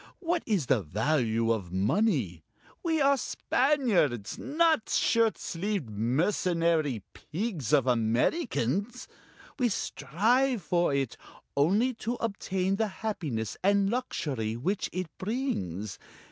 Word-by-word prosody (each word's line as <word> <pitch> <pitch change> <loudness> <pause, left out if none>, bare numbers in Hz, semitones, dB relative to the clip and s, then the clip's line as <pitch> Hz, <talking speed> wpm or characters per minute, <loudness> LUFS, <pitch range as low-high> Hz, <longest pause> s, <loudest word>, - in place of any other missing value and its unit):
What 340 -1 0
is 200 - +1
the 120 -2 +2
value 115 - +1
of 100 -6 -2
money 100 - +1 0.4
we 325 -2 +1
are 280 -1 +4
Spaniards, 225 - +1
not 315 -2 +2
shirt 230 -1 +2
sleeved, 180 - -3
mercenary 155 - +1
pigs 170 - -4
of 135 - +4
Americans! 125 - 0 0.5
We 245 -2 +3
strive 235 - +1
for 175 0 +1
it, 135 -3 -1 0.4
only 200 - +3
to 235 +2 -1
obtain 195 -4 -1
the 220 0 +1 0.2
happiness 145 - -2
and 200 0 +3
luxury 135 - -2
which 185 - -1
it 185 0 -2
brings. 110 - -3
180 Hz, 110 wpm, -29 LUFS, -, 0.5 s, are